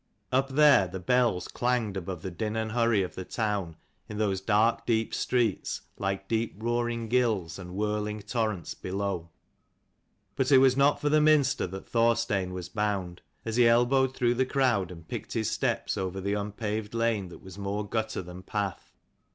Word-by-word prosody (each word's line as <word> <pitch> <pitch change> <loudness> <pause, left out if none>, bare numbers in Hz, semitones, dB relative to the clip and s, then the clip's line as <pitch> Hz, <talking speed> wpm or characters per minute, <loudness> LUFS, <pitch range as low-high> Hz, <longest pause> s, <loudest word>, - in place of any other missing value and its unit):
Up 135 +1 +2
there 140 -8 +5
the 95 +2 -6
bells 120 -2 +1
clanged 120 -5 -1
above 90 -2 -5
the 95 - -4
din 105 +5 -3
and 110 -1 -2
hurry 115 -3 +2
of 90 - -5
the 95 - -6
town 100 -6 -2 0.3
in 105 - -6
those 100 -3 0
dark 110 +3 +2
deep 115 -2 +1
streets, 120 -6 0 0.2
like 95 0 -2
deep 115 +1 -1
roaring 120 +1 -1
gills 110 -8 0
and 90 -1 -8
whirling 105 0 -2
torrents 110 - -2
below. 95 -3 -3 1.1
But 130 +1 0
it 135 - +8
was 130 -1 +5
not 140 +2 +3
for 145 0 0
the 155 +1 +4
Minster 150 -7 +3
that 95 +2 -8
Thorstein 115 -5 +1
was 90 -1 -5
bound, 95 -2 -2 0.2
as 115 0 -2
he 120 -1 +6
elbowed 130 +3 +3
through 120 -1 +3
the 130 +2 +2
crowd, 125 -10 +1
and 85 -3 -11
picked - - -6
his - - 0
steps - - -1
over 95 0 -3
the 100 +1 -1
unpaved 105 +1 -3
lane 115 -5 0
that - - -13
was 95 +1 -10
more 100 +1 -3
gutter 110 -2 -2
than 90 +1 -9
path. 100 -1 -4
105 Hz, 175 wpm, -28 LUFS, 95-120 Hz, 1.1 s, it